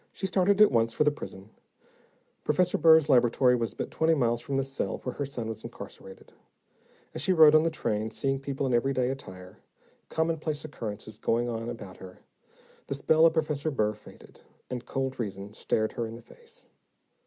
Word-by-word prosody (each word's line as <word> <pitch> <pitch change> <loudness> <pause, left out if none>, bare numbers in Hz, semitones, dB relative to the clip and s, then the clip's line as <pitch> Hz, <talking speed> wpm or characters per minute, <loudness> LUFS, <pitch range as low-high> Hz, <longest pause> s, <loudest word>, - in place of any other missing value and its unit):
She - - -5
started 190 +1 +2
at 210 - +7
once 115 -2 +2
for - - +2
the 150 - +3
prison. 105 -8 -10 0.9
Professor 180 +4 +1
Burr's 160 -1 +6
laboratory 125 -1 +4
was 115 -2 -3
but - - -5
twenty 160 0 +2
miles 120 -4 +1
from 135 +2 -3
the 135 - +1
cell 135 0 -3
where 125 - -3
her 140 - -4
son 120 -5 -5
was 110 -1 -6
incarcerated. 95 - -11 0.8
As - - -4
she 185 - +2
rode 155 -3 +7
on 155 - +7
the 165 - +1
train, 110 -8 -2
seeing 135 +4 -2
people 135 0 -3
in 130 - 0
everyday 130 +1 +1
attire, 90 -8 -10 0.5
commonplace 160 -2 -2
occurrences 110 -6 -7
going 120 +1 0
on 115 0 -4
about 105 -6 -8
her, 95 -1 -12 0.7
the 140 - -2
spell 160 +4 +4
of 165 - +1
Professor 155 -1 0
Burr 105 -7 0
faded, 105 - -16 0.3
and 125 -1 -5
cold 135 -1 -3
reason 100 -2 -5
stared 110 0 -1
her 115 - -3
in 110 - -8
the 120 - -12
face. 475 - -15
130 Hz, 185 wpm, -28 LUFS, 115-155 Hz, 0.9 s, at